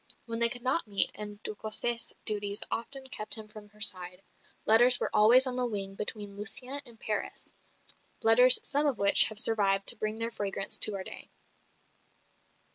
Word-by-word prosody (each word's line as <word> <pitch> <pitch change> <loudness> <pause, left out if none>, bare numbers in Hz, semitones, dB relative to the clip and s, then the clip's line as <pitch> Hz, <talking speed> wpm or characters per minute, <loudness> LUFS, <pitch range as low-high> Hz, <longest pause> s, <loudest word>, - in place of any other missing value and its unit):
When 230 -1 -6
they 235 0 +6
could 245 0 -7
not 260 +2 -2
meet 200 -1 +3
and 210 0 -10
de - - -4
Cossé's 220 +2 -4
duties 205 -1 -2
often 265 +3 -6
kept 215 -6 +4
him 220 -1 -5
from 210 -1 -15
her 210 +1 -25
side 180 -2 0 0.4
letters 240 +3 +5
were - - -4
always 230 +5 +5
on 255 -1 -5
the 250 -1 -2
wing 195 -3 -4
between 205 0 -6
Lucienne 250 +6 -3
and 230 -2 -15
Paris, 215 - -5 0.7
letters 250 +3 +7
some 290 +1 0
of 270 -6 -2
which 200 0 +5
have 215 -1 -7
survived 195 -3 +1
to - - +2
bring 215 +1 -5
their 230 +1 -4
fragrance 195 -2 -4
to 210 - +3
our 190 - -6
day. - - -12
215 Hz, 180 wpm, -28 LUFS, 205-240 Hz, 0.7 s, letters